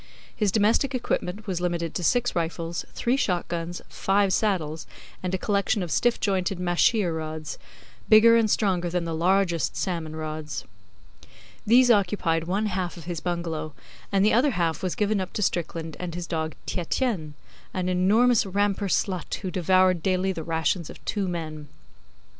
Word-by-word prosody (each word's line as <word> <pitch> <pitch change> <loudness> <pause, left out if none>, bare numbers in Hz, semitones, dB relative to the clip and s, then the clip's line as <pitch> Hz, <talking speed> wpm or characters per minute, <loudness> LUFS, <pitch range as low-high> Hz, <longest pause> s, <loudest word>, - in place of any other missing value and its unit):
His 210 -3 +1
domestic 225 +6 +2
equipment 210 -4 -2
was 185 -4 -2
limited 170 -2 -1
to 180 - -3
six 245 +6 +2
rifles, 165 0 -2
three 240 +2 +1
shot 180 -9 0
guns, 170 0 -4
five 195 0 +1
saddles, 165 -7 -1 0.3
and 185 - -2
a - - -1
collection 200 0 0
of 170 - -5
stiff 240 +10 +2
jointed 190 -2 0
mahseer 180 +1 +2
rods, 155 -1 -5 0.5
bigger 225 +1 +8
and 225 -2 +3
stronger 185 -5 +1
than 175 0 -1
the 165 - -3
largest 175 0 +1
salmon 165 -4 -3
rods. 155 -6 -5 1.0
These 245 +2 +6
occupied 180 -6 +1
one 195 +5 0
half 185 -3 -2
of 170 - -9
his 170 0 -4
bungalow, 165 -3 -3 0.4
and 195 0 +3
the 215 - +4
other 255 +6 +4
half 165 -3 0
was 185 -2 -2
given 210 -1 +1
up 185 - -6
to 210 - -1
Strickland 165 -3 -2
and 175 -2 -5
his 175 -1 -4
dog 160 -2 -3
Tietjens 180 - -2 0.4
an 185 -1 -2
enormous 210 +7 +4
Rampur 200 +1 0
slut 185 -1 -1
who 190 -3 -4
devoured 185 -1 +3
daily 185 +1 +1
the 165 - -5
rations 165 +1 -1
of - - -9
two 200 -3 -1
men. 155 -4 -5
180 Hz, 165 wpm, -25 LUFS, 165-205 Hz, 1.0 s, bigger